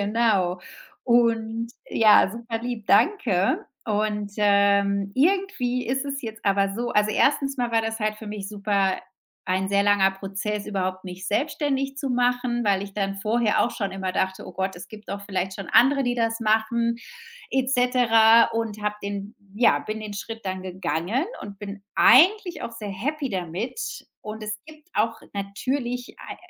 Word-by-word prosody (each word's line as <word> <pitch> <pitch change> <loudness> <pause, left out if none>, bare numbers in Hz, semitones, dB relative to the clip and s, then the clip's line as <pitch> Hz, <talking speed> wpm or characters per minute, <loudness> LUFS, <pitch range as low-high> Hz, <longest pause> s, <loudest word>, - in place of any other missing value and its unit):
Genau. 200 -4 +1 0.4
Und 230 -2 +2 0.2
ja, 215 -3 +5
superlieb, 230 0 -5
danke. 285 - +2 0.2
Und, 210 -1 -1
ähm, 200 -1 +3
irgendwie 285 -6 +1
ist 265 +3 -1
es 280 -1 -4
jetzt 225 -3 -8
aber 195 0 +2
so 240 +2 -2
also, 210 0 +2
1. 275 +4 +2
mal 245 -2 -1
war 225 - +4
das 225 0 -3
halt 215 -1 -1
für 220 - -10
mich 205 -2 -5
super 200 -2 0 0.5
ein 190 +1 0
sehr 200 0 +2
langer 205 -2 +4
Prozess, 200 +2 -4
überhaupt 185 -2 -3
mich 185 +1 -7
selbstständig 275 +1 -1
zu 275 -1 -3
machen, 245 -1 +1
weil 200 -2 +2
ich 200 -1 -9
dann 195 -1 -1
vorher 215 +2 +1
auch 240 - -2
schon 200 -5 -3
immer 190 -1 -3
dachte: 190 0 -2
„Oh - - -8
Gott, 190 0 -2
es 175 - -10
gibt 215 -1 -13
doch 200 0 -5
vielleicht 190 -1 -3
schon 195 - -7
andere, 275 +2 +5
die 245 -1 -1
das 230 0 0
machen“, 230 +2 +1 0.6
et 265 -1 +1
cetera. 230 -3 +5
Und 225 -2 -3
habe 210 0 -1
den 200 +1 -5 0.2
ja, 230 +3 +4
bin 215 +1 -5
den 210 -1 -6
Schritt 225 +3 -7
dann 185 -1 -3
gegangen 185 - -1 0.2
und 200 -1 -9
bin 200 -1 -7
eigentlich 375 0 +5
auch 235 - -5
sehr 215 -3 -7
happy 275 +7 -3
damit. 185 - -4 0.4
Und 215 +1 -7
es 215 0 -4
gibt 310 +2 -15
auch 225 +1 0
natürlich 245 +5 -3
ei - - -8
215 Hz, 170 wpm, -24 LUFS, 200-245 Hz, 0.6 s, ja